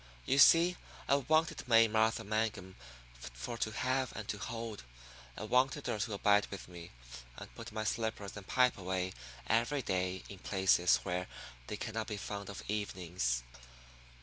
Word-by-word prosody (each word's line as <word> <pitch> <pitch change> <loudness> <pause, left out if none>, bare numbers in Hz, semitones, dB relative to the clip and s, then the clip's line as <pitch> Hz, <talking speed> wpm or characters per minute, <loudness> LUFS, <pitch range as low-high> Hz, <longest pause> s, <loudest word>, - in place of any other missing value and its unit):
You 140 - +2
see, 170 +5 +7 0.3
I - - +3
wanted 155 +2 +1
May 115 -1 +6
Martha 110 +1 +2
Mangum 105 -3 -2 0.4
for - - -7
to 110 - 0
have 130 +3 -1
and 110 -2 -6
to 105 - -3
hold. 115 +1 -5 0.6
I - - -5
wanted 125 +4 +2
her 105 - -2
to 105 +1 -2
abide 105 +1 +3
with 100 - -7
me, 85 -1 -10 0.5
and - - -10
put 115 0 -9
my 110 0 -3
slippers 110 -2 -2
and 100 -2 -9
pipe 125 -4 +3
away 95 0 -2 0.3
every 120 +5 +1
day 95 -1 -1
in 100 - -10
places 95 -3 +3
where 90 +1 -2 0.4
they 105 - -4
cannot 110 0 -4
be 105 -2 -4
found 100 0 -5
of 100 - -7
evenings. 90 - -2
105 Hz, 160 wpm, -33 LUFS, 95-115 Hz, 0.6 s, see